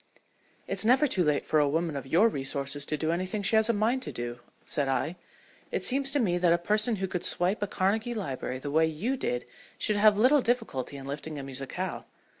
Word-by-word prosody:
"It's - - +3
never 255 +6 +4
too 190 -10 +1
late 150 -2 +1
for 155 - +2
a 145 -1 +3
woman 160 +1 -1
of 135 -1 -5
your 175 +11 +4
resources 140 -4 -1
to 155 - -1
do 160 +2 -1
anything 185 +4 -2
she 220 - +2
has 220 +1 +3
a - - +4
mind 230 +5 +1
to - - -6
do," 120 0 -5 0.3
said 145 -2 0
I. 135 +6 -1 0.5
"It - - -1
seems 275 +1 +3
to 285 - +1
me 180 -7 +1
that 175 -1 +3
a 170 - +4
person 210 +6 +1
who 195 -1 -2
could 180 -2 -4
swipe 185 +4 +2
a 205 - 0
Carnegie 215 +6 -1
library 130 - -4
the 140 +2 -6
way 160 +2 +3
you 185 - -2
did 125 - -3 0.3
should 210 - 0
have 210 0 +5
little 260 +6 +5
difficulty 225 - -2
in 135 - -9
lifting 145 +2 -6
a 140 - -5
musicale. 135 0 -5
175 Hz, 225 wpm, -28 LUFS, 145-220 Hz, 0.5 s, have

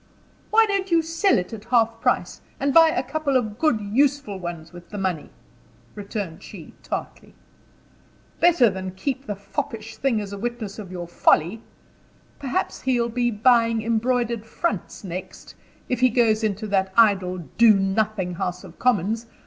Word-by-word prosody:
"Why 450 +1 +5
don't 395 -2 -1
you 335 -2 +3
sell 330 +5 +2
it 180 +3 -3
at 215 -1 -8
half 230 -2 +1
price, - - 0 0.2
and 280 0 0
buy 325 0 +8
a 320 - -1
couple 280 0 0
of 215 -3 -3
good 305 -9 +2
useful 255 0 0
ones 170 -2 -7
with 175 -1 -12
the 205 - -7
money?" 185 -6 -2 0.6
returned 200 -5 -6
she, - - -11
tartly. - - -6 1.0
"Better 340 -7 +5
that 210 - +2
than 185 0 -6
keep 265 +6 -3
the 205 - -3
foppish 225 +1 -5
thing 265 -5 +1
as 200 -1 -6
a 200 - -6
witness 230 -3 -5
of 195 -4 -8
your 175 -2 -6
folly. 175 +4 +2 0.8
Perhaps 270 -2 -2
he'll 245 -3 +1
be 240 +1 0
buying 230 0 +3
embroidered 235 0 0
fronts 210 -3 -4
next, 185 0 -8 0.3
if 250 - -1
he 255 0 +5
goes 225 -2 +2
into 215 0 -1
that 190 -2 0
idle, 195 -5 +4 0.2
do 230 -2 +7
nothing 195 -1 0
House 180 +1 -4
of - - -14
Commons. 225 -1 +1
220 Hz, 165 wpm, -23 LUFS, 195-250 Hz, 1.0 s, buy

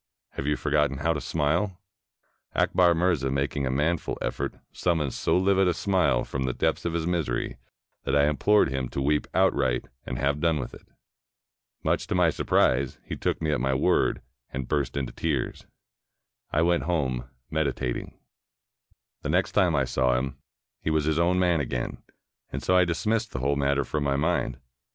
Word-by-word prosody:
Have 70 - -5
you 75 - +2
forgotten 75 -2 +1
how 80 +4 +1
to 75 - -4
smile?" 85 +6 0 0.8
Akbar 90 -2 +4
Mirza, 80 -6 +1
making 70 0 -1
a - - 0
manful 75 +5 0
effort, - - -3 0.2
summoned 80 -7 0
so - - +1
livid 95 0 +3
a 90 - +1
smile 90 -11 +2
from 65 -1 -3
the 65 -1 -2
depths - - 0
of 85 - -1
his 85 -1 -1
misery, 85 -9 -1 0.5
that - - 0
I 70 0 +4
im 75 -1 0
plored 105 -6 +4
him 65 -2 -2
to - - -4
weep 75 +2 +1
outright 65 -2 +2 0.2
and 65 - -5
have 70 +2 0
done 80 0 +2
w^th 65 - -5
it. - - -14 1.0
Much - - 0
to - - -1
my 90 -3 +4
surprise, 65 -2 +2
he - - -4
took - - -2
me 80 - +1
at 75 - 0
my 65 +1 +1
word, 65 - +2 0.3
and 65 -2 -5
burst 70 -2 -1
into 65 -3 -3
tears. 75 -6 -2 0.8
I 75 - +2
went 85 0 +2
home, 65 -7 -1 0.2
meditating. 70 -6 -2 1.0
The - - -4
next - - +2
time 90 -4 +3
I 70 -2 +2
saw 65 0 +1
him, 65 +1 -2 0.5
he - - -1
was 80 -1 +1
his 80 +1 +1
own 90 +2 +3
man 90 -3 +3
again, - - -3 0.5
and - - -4
so 90 - +2
I 90 -1 +6
dismissed 110 +6 -1
the 65 - -2
whole 70 +3 +1
matter 70 0 +1
from 75 +2 -2
my 70 -1 +1
mind. 75 -4 0
75 Hz, 185 wpm, -26 LUFS, 65-85 Hz, 1.0 s, I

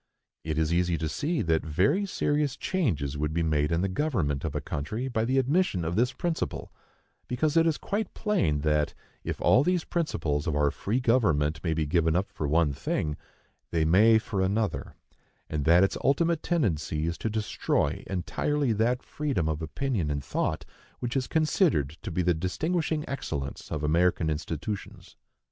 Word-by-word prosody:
It 80 -1 -3
is 80 +1 +1
easy 90 -1 +2
to 80 - -2
see 155 - -1
that 80 -1 +2
very 100 - +1
serious 145 -5 0
changes 75 - -1
would 75 +1 -1
be 85 - +1
made 75 -1 +1
in 85 +1 +1
the 95 - +1
government 95 - -1
of 80 -3 -3
a - - +1
country 85 - -4
by 115 -3 0
the 130 +3 +1
admission 135 - +1
of 85 +2 -1
this 125 +4 +2
principle: 170 +1 -3 0.6
because 145 +5 0
it 165 0 +5
is 160 - +1
quite 205 0 -3
plain 90 - +1
that, 75 0 +1 0.3
if - - -4
all 130 - +5
these 180 0 +1
principles 80 - -1
of 80 - 0
our 75 -1 +2
free 110 +6 -1
government 80 - +2
may 80 -3 0
be 80 -1 0
given 80 +1 +2
up 95 +2 0
for 80 -6 -3
one 75 -1 +2
thing, 75 +2 -2 0.5
they 80 -2 +1
may 105 +7 +6
for 105 -3 -2
another, 100 +3 -1 0.5
and 75 -2 -2
that 85 +3 +6
its 95 - 0
ultimate 165 +4 +2
tendency 80 - 0
is 85 0 -1
to 110 - -1
destroy 110 0 -1
entirely 125 +8 0
that 120 +4 +1
freedom 140 - -2
of 80 0 -2
opinion 90 - -2
and 70 -1 -2
thought 65 - -2 0.3
which 120 +1 -4
is 130 -2 0
considered 155 - +2
to 110 - -5
be 90 +1 -1
the 90 0 +3
distinguishing 155 - -1
excellence 70 - -5
of 75 - -3
American 80 +1 +2
institutions. 80 +6 -5
90 Hz, 175 wpm, -28 LUFS, -, 0.6 s, may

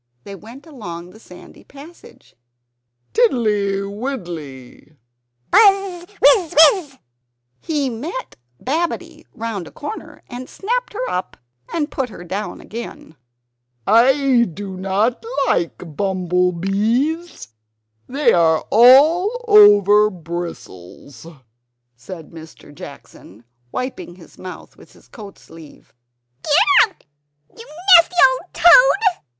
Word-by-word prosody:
They 200 - -10
went 230 +8 -13
along 180 - -10
the 220 - -17
sandy 180 -5 -16
passage 295 +5 -17 0.8
"Tiddly, 210 - 0
widdly 175 - -8 0.3
" 120 0 -48
"Buzz! 390 -4 +3
Wizz! 365 -9 +3
Wizz!" 305 -2 +4 0.6
He 295 -4 -3
met 320 - -7 0.2
Babbitty 325 +6 -4
round 220 -6 -6
a - - -14
corner, 430 +9 -9
and 250 +1 -9
snapped - - -4
her - - -4
up, 180 - -5 0.3
and 305 -3 -3
put 265 -3 -3
her 185 -4 -11
down 195 +4 -6
again. 225 -7 -10 0.7
"I 255 +2 +3
do 195 +2 -8
not 195 - -2 0.2
like 170 - -3
bumble 180 -1 -1
bees. 225 - -2 0.6
They 270 -2 +1
are 160 -2 +2
all 320 - +4
over 210 - +5
bristles," 165 - -10 0.7
said 160 +7 -12
Mr. 160 -2 -14
Jackson, 110 -6 -14 0.3
wiping 255 -8 -6
his 175 -3 -18
mouth 185 -1 -11
with - - -19
his - - -22
coat 205 -5 -13
sleeve. 160 -2 -17 0.5
"Get 375 +8 +3
out, - - -29 0.5
you 460 - -13 0.3
nasty 340 +1 +4 0.2
old - - -19
toad!" 395 +1 +4
225 Hz, 110 wpm, -18 LUFS, -, 0.8 s, over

